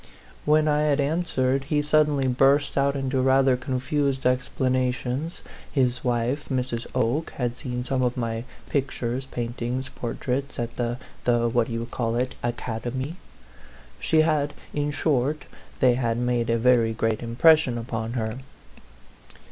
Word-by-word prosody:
9 150 - +5
"When 155 0 +3
I 150 0 +3
had 150 -1 +2
answered, 140 -3 0
he 150 +1 +1
suddenly 150 -2 +3
burst 135 +3 +3
out 140 0 +2
into 135 -1 0
rather 130 0 +4
confused 130 +2 -1
explanations, 130 +3 0 0.3
his 125 -3 +1
wife 125 +3 -1
Mrs. 125 -3 -2
Oke 135 +8 +1
had 120 -2 -2
seen 125 -2 -4
some 130 0 -1
of 125 0 0
my 115 -1 -2 0.2
pictures 130 -2 -2
paintings 120 +2 -3
portraits 130 +3 -3
at 120 -1 -3
the 120 0 -1 0.3
the 120 -1 +3
what 115 0 +1
d'you 115 0 -3
call 115 -1 -2
it? 125 +1 -1
Academy. 120 +5 -3 0.8
She 160 - +3
had 150 -2 +1 0.2
in 145 0 0
short, 145 0 0 0.4
they 130 -2 +6
had 120 -2 0
made 120 -1 0
a 115 - +3
very 115 -1 +3
great 115 -1 0
im 115 -1 -5
pression 155 -3 +5
upon 115 -1 -4
her. 110 0 -2
130 Hz, 145 wpm, -25 LUFS, 120-140 Hz, 0.8 s, they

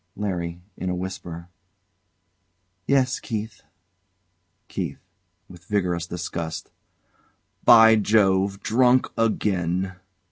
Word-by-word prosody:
LARRY. 90 -4 -4
[In 90 - -3
a 90 - -1
whisper] 90 -2 -6 1.4
Yes, 135 -2 +2
Keith. 110 -2 -5 1.1
KEITH. - - -4 0.5
[With 90 -1 -15
vigorous 90 -5 -1
disgust] 85 -2 -5 0.9
By 110 -1 +8
Jove! 100 -2 +2
Drunk 125 +2 +3
again! 95 -4 0
95 Hz, 80 wpm, -24 LUFS, 90-110 Hz, 1.4 s, By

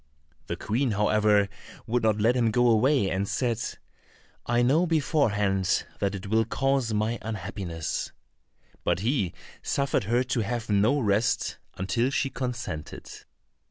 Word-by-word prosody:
The - - -2
Queen, 120 +2 -1
however, 105 0 +3 0.4
would 120 +2 0
not 110 -1 +2
let 115 +4 +3
him 120 -3 +2
go 120 +2 +3
away, 115 -2 +3
and 95 +1 -1
said, 120 -1 -1 0.9
"I 120 +1 +2
know 155 +8 +3
beforehand 105 - +1
that 100 0 0
it 100 +1 -7
will 110 +3 +2
cause 135 +1 0
my 110 +2 0
unhappiness;" 95 -7 -4 0.7
but - - 0
he 110 - 0 0.3
suffered 140 -7 0
her 120 +4 +2
to 125 -1 -1
have 115 +1 -2
no 110 +8 +3
rest 110 0 +1 0.2
until 115 +7 0
she 135 0 -1
consented. 120 - -5
115 Hz, 135 wpm, -27 LUFS, 105-125 Hz, 0.9 s, however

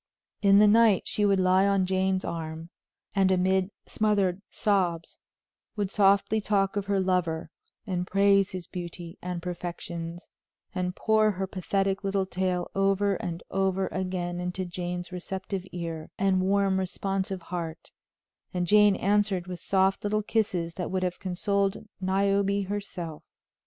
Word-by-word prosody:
In 200 -1 +6
the 210 +1 +7
night 220 -2 +5
she 210 -1 +1
would 195 -1 +3
lie 185 +1 +4
on 195 -2 +2
Jane's 190 0 0
arm, 160 0 -5 0.4
and 195 -1 +3
amid 190 +1 +2 0.2
smothered 200 -3 +1
sobs, 180 -6 0 0.6
would 205 -3 -2
softly 200 +1 +3
talk 200 -2 +1
of 200 -1 -2
her 200 -1 +2
lover, 175 -4 0 0.3
and 180 -3 -2
praise 195 0 +4
his 185 -2 -6
beauty 175 -1 -7
and 180 -1 -4
perfections, 170 -1 -6 0.5
and 180 -1 -2
pour 220 -1 +3
her 190 -2 -2
pathetic 195 +1 -1
little 195 -1 0
tale 185 -1 -2
over 195 +1 +2
and 170 -1 -5
over 190 0 +1
again 180 -1 -3
into 180 +1 -3
Jane's 175 +1 -5
receptive 190 +1 -5
ear 165 -2 -5
and 190 -1 +2
warm 195 0 +2
responsive 190 0 -2
heart; 165 -2 -6 0.6
and 180 -1 +1
Jane 210 +2 +5
answered 200 -2 +1
with 180 -1 -6
soft 190 0 +1
little 215 +1 0
kisses 185 -7 0
that 180 - -4
would 185 0 -1
have 180 -1 -2
consoled 195 +2 -1 0.2
Niobe 200 +1 +1
herself. 185 -6 -5
190 Hz, 140 wpm, -27 LUFS, 180-200 Hz, 0.6 s, the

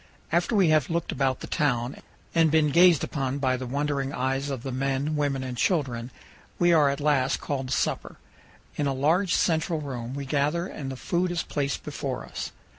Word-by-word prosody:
After 175 +7 +1
we 190 -5 +4
have 155 -2 +3
looked 170 0 -1
about 135 -2 0
the - - -5
town 125 -5 0 0.4
and 165 -1 +4
been 150 -1 +3
gazed 170 0 +6
upon 135 -2 -2
by 130 -2 +1
the 130 0 -5
wondering 140 0 -1
eyes 135 +2 -1
of 130 -4 -4
the 135 - -4
men, 135 +3 -1
women, 140 -3 0
and 130 -1 -4
children, 125 -6 0 0.5
we 175 -1 +4
are 150 -3 +5
at 140 - -2
last 145 -3 +2
called 135 -3 -3
to - - +1
supper. - - -2 0.6
In 145 - +1
a 135 - 0
large 165 +8 +2
central 160 0 +1
room 130 -4 -5
we 140 0 -4
gather 150 +5 0
and 140 -7 -6
the 130 - -6
food 180 +6 0
is 175 -1 -1
placed 140 -2 -2
before - - -4
us. - - -6
140 Hz, 195 wpm, -26 LUFS, 130-160 Hz, 0.6 s, gazed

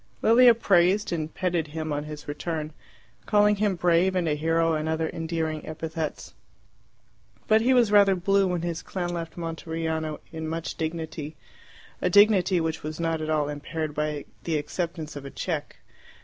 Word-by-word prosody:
Lilia 240 +1 +7
praised 195 -1 +3
and 160 -1 -3
petted 175 -4 -1
him 155 0 -4
on 145 +1 -3
his 150 0 -8
return, 155 +1 -4 0.5
calling 210 0 +4
him 205 -2 +1
brave 175 +2 +2
and 180 -2 +1
a 155 - +2
hero 165 +2 +1
and 155 0 -1
other 160 0 0
endearing 160 -1 -3
epithets. 160 0 -5 1.1
But 220 0 +5
he 255 +3 +3
was 235 -4 +4
rather 200 -2 +6
blue 195 +2 +2
when 175 -2 -2
his 170 -1 -3
clan 180 -2 -4
left 165 -1 -5
Monteriano 160 -1 -3
in 160 -1 -5
much 165 +1 -3
dignity 160 -1 -5 0.7
a 180 - +2
dignity 200 -2 +5
which 160 -1 -2
was 155 +1 -6
not 165 -1 -1
at 155 - -3
all 150 -2 +1
impaired 150 +1 -4
by 150 -1 -2 0.2
the 160 -2 0
acceptance 160 0 -4
of 145 - -7
a 140 - -7
cheque. - - -4
165 Hz, 165 wpm, -26 LUFS, 155-180 Hz, 1.1 s, Lilia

